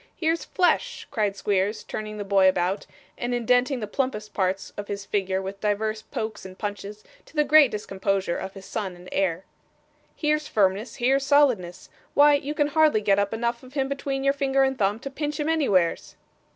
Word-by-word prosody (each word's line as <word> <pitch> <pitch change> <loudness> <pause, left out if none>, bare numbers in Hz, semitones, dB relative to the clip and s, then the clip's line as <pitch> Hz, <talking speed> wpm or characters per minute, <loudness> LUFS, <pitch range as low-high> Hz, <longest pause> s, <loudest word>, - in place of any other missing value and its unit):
Here's 330 0 0
flesh!' 475 +6 0
cried 210 -6 0
Squeers, 205 +1 0
turning 215 0 -6
the 205 - -3
boy 195 -1 +4
about, 185 +2 -1 0.3
and 245 0 -1
indenting 245 +2 +2
the - - -2
plumpest 210 -2 -3
parts 190 0 -1
of 205 0 -6
his 200 0 -5
figure 190 -2 -1
with 195 +1 -7
divers 215 +1 -1
pokes 220 0 -5
and 190 0 -10
punches, 205 0 -6 0.2
to - - -19
the 300 - +4
great 295 -1 +6
discomposure 195 -3 -2
of 190 +1 -6
his 195 -1 -10
son 195 -5 -4
and 175 +1 -14
heir. 190 -1 0 0.7
'Here's 305 -1 0
firmness, 200 +2 +1
here's 270 +3 +2
solidness! 250 -12 +2 0.3
Why 290 +1 +7
you 285 +1 -1
can 295 -1 +1
hardly 300 -6 +3
get 200 -1 +3
up 200 0 0
enough 235 +1 -2
of 260 +2 -15
him 270 -2 +1
between 275 -1 -3
your 275 0 +3
finger 275 -1 +2
and 265 0 +1
thumb 205 -3 +1
to 275 - -6
pinch 295 +1 -3
him 295 - -1
anywheres. 205 - +1
215 Hz, 190 wpm, -25 LUFS, 195-275 Hz, 0.7 s, Why